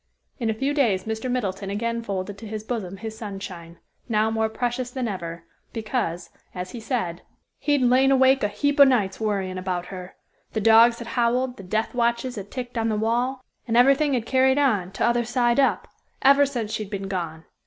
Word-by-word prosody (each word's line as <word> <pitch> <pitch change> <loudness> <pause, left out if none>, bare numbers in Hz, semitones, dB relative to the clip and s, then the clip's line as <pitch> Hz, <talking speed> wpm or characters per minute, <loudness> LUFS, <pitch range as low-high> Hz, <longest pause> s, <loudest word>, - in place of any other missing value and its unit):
In 230 -3 0
a 220 - 0
few 270 +5 -1
days 225 -10 +2
Mr. 220 +4 -3
Middleton 195 -6 -2
again 230 +3 -2
folded 200 -2 -4
to 225 - -8
his 215 0 -5
bosom 210 -5 -4
his 220 +1 -6
Sunshine, 195 -6 -8 0.3
now 220 0 +2
more 220 0 0
precious 245 +2 -2
than 250 -1 -3
ever, 170 -4 -5 0.3
because, 215 -7 -3 0.2
as 180 0 -5
he 240 - -7
said, 220 -8 -3 0.4
"He'd 290 -3 +1
lain 255 +2 +4
awake 265 0 +5
a 205 - +2
heap 285 +8 -1
o' - - +12
nights, 225 -8 +2
worryin' 195 -4 -1
about 180 -1 -3
her. 185 0 -9 0.4
The 220 - 0
dogs 225 +2 +6
had 235 0 -8
howled, 250 +1 0
the - - -9
death 215 +4 -1
watches 235 +1 0
had 200 -2 -7
ticked 245 -1 -5
on 225 0 0
the 215 - 0
wall, 245 +4 -1 0.2
and 230 0 +1
everything 275 +3 +5
had 235 -3 -2
carried 265 +1 +3
on, 210 -11 +2
t'other 240 +4 +1
side 240 +1 +1
up, 270 - +2 0.4
ever 280 +1 +6
since 235 -6 -4
she'd 215 -2 -4
been 195 -1 -4
gone. 165 -4 -4
225 Hz, 195 wpm, -24 LUFS, 195-250 Hz, 0.4 s, o